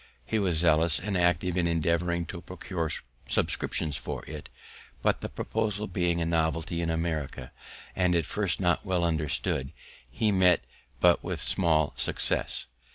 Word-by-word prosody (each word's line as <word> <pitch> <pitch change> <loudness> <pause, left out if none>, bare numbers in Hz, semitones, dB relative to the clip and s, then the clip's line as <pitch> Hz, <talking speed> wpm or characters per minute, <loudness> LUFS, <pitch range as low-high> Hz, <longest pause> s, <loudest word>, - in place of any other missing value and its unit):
He 110 - 0
was 90 -5 +1
zealous 80 0 +3
and 100 +1 -3
active 90 0 +2
in 90 -2 +2
endeavouring 85 +1 +1
to 85 0 -7
procure 90 -3 -4 0.4
subscriptions 75 -3 0
for - - -5
it, 75 -1 -8 0.5
but - - +2
the - - -4
proposal 105 -2 -2
being 90 -5 0
a 85 - 0
novelty 80 +1 0
in 85 - -1
America, 80 -6 -3 0.4
and 90 -1 +2
at 85 -3 +1
first 100 -1 0
not 90 -3 +2
well 90 -3 0
understood, 80 -2 0 0.4
he 105 - +1
met 90 -3 +4 0.4
but 90 -1 +5
with - - -3
small 80 -5 +2
success. - - +1
85 Hz, 150 wpm, -28 LUFS, 80-90 Hz, 0.5 s, but